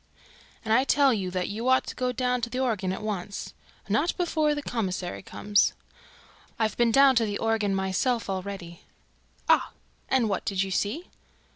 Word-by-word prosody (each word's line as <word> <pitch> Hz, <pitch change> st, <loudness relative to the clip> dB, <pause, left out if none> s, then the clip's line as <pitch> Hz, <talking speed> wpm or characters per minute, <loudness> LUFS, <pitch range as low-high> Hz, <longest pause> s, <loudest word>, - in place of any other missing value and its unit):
"And 220 Hz, -, +2 dB
I 255 Hz, +3 st, +5 dB
tell 275 Hz, -1 st, +4 dB
you 195 Hz, -4 st, -2 dB
that 180 Hz, 0 st, -2 dB
you 225 Hz, +5 st, -2 dB
ought 260 Hz, -, +4 dB
to -, -, -7 dB
go 250 Hz, 0 st, -1 dB
down 250 Hz, -1 st, 0 dB
to 235 Hz, -, -2 dB
the 250 Hz, -, -5 dB
organ 215 Hz, -8 st, 0 dB
at 190 Hz, -, -5 dB
once." 200 Hz, -2 st, -4 dB, 0.3 s
"Not 280 Hz, -, +1 dB
before 315 Hz, -4 st, +1 dB
the 290 Hz, -, -4 dB
commissary 185 Hz, -8 st, -3 dB
comes." 205 Hz, +1 st, +1 dB, 0.8 s
"I've 220 Hz, -2 st, 0 dB
been 235 Hz, -1 st, +3 dB
down 270 Hz, +2 st, +6 dB
to 230 Hz, -, +3 dB
the 205 Hz, -1 st, -2 dB
organ 220 Hz, -3 st, 0 dB
myself 195 Hz, +6 st, 0 dB
already." 190 Hz, -3 st, -5 dB, 0.7 s
"Ah! -, -, +3 dB, 0.4 s
And 255 Hz, -4 st, +3 dB
what 195 Hz, -3 st, -1 dB
did 195 Hz, -1 st, 0 dB
you 195 Hz, -, -5 dB
see?" 220 Hz, -, -2 dB
220 Hz, 175 wpm, -27 LUFS, 195-255 Hz, 0.8 s, down